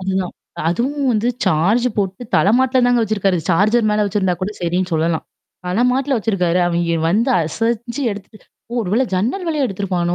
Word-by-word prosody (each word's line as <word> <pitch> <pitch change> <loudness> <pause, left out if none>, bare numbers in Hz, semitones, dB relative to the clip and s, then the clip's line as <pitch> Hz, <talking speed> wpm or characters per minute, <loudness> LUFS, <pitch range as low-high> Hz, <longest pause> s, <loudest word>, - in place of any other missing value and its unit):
அதுதான். 190 -1 -2 0.4
அதுவும் 270 - -1
வந்து 225 +2 +1 0.2
சார்ஜ் 190 +8 +2
போட்டு 195 +2 -2
தலமாட்ல 255 +5 +3
தாங்க 245 -1 +3
வச்சிருக்காரு. 200 -3 +1
சார்ஜ்ர் 215 +6 +3
மேல 210 0 +2
வச்சிருந்தா 190 -3 0
கூட 205 +3 -2
சரின்னு 180 +2 -1
சொல்லலாம். 160 0 0 0.4
தல 185 +6 0
மாட்ல 270 +1 0
வச்சிருக்காரு. 185 -5 0
அவன் 170 0 0 0.2
வந்து 230 +7 +2
அசஞ்சு 235 - -2
எடுத்துட்டு 205 +1 -12 0.2
ஓ! - - -9
ஒரு 185 - -5
வேள 245 +4 +3
ஜன்னல் 235 - -1
வேலையே 310 -4 0
எடுத்தத்துருப்பனோ 185 -5 -1
205 Hz, 160 wpm, -18 LUFS, 180-240 Hz, 0.4 s, தலமாட்ல